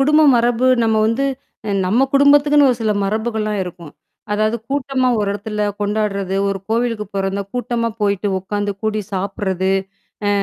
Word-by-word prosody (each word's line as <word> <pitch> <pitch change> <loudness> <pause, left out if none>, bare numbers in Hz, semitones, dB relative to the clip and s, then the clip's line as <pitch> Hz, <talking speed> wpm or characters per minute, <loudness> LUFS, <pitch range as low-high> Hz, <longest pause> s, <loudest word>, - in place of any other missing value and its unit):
குடும்ப 300 +3 +4
மரபு 240 +1 +2 0.2
நம்ம 220 -1 +2
வந்து 235 +5 0 0.6
நம்ம 240 +8 +3
குடும்பத்துக்குன்னு 290 0 +5
ஒரு 240 - 0
சில 215 -1 +2
மரபுகள்லாம் 215 0 -1
இருக்கும். 170 -4 -10 0.4
அதாவது 215 +2 +1
கூட்டமா 270 -2 0
ஒரு 205 -1 0
இடத்துல 210 +1 -4 0.2
கொண்டாடுறது, 205 -2 -1
ஒரு 195 - -2
கோவிலுக்கு 230 -2 0
போறதுன்னா 195 0 -1
கூட்டமா 240 -1 -1
போயிட்டு 200 0 0
உக்காந்து 205 +2 -3
கூடி 215 0 0
சாப்பிடுறது, 190 -1 -1 0.6
அ - - +2
215 Hz, 140 wpm, -19 LUFS, 200-245 Hz, 0.6 s, குடும்பத்துக்குன்னு